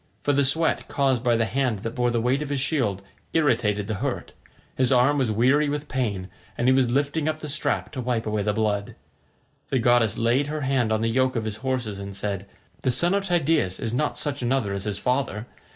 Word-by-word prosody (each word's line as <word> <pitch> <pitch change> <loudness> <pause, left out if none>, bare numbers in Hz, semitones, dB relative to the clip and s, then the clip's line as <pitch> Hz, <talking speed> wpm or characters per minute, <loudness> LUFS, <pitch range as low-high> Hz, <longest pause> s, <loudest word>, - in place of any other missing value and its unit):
For 145 - +2
the 140 +1 +3
sweat 160 +5 +2
caused 135 -4 +1
by 120 -2 +3
the 115 0 +2
hand 120 -4 -1
that 115 - -2
bore 125 -1 +1
the 120 -1 0
weight 125 +5 +1
of 150 - -4
his 140 -1 -1
shield 125 - 0 0.3
irritated 115 -10 +2
the 110 - -3
hurt: - - -3 0.4
his 130 0 +2
arm 130 +3 +4
was 130 -4 +1
weary 130 +7 +3
with 145 +1 -3
pain, 105 -8 -2 0.3
and 120 - 0
he 130 - +6
was 130 -2 +3
lifting 145 +4 0
up 155 0 -3
the 155 - -6
strap 145 +1 -1
to 135 -4 -4
wipe 120 -2 -1
away 105 -1 -1
the 105 +1 +1
blood. 105 -1 -1 0.7
The - - +1
goddess 120 -3 +3
laid 120 +5 +2
her 155 +1 -3
hand 130 -4 +1
on 110 0 +1
the 115 - +1
yoke 130 +3 +1
of 115 -2 -1
his 110 -1 -3
horses 120 -5 -3
and 100 0 -7
said, 100 -1 -3 0.3
"The 130 - 0
son 170 +9 +3
of 200 0 0
Tydeus 160 - +1
is 115 0 -3
not 150 +5 0
such 145 -2 -2
another 120 -5 0
as 100 0 -3
his 105 -2 -2
father. 125 -4 -1
125 Hz, 225 wpm, -24 LUFS, 110-140 Hz, 0.7 s, he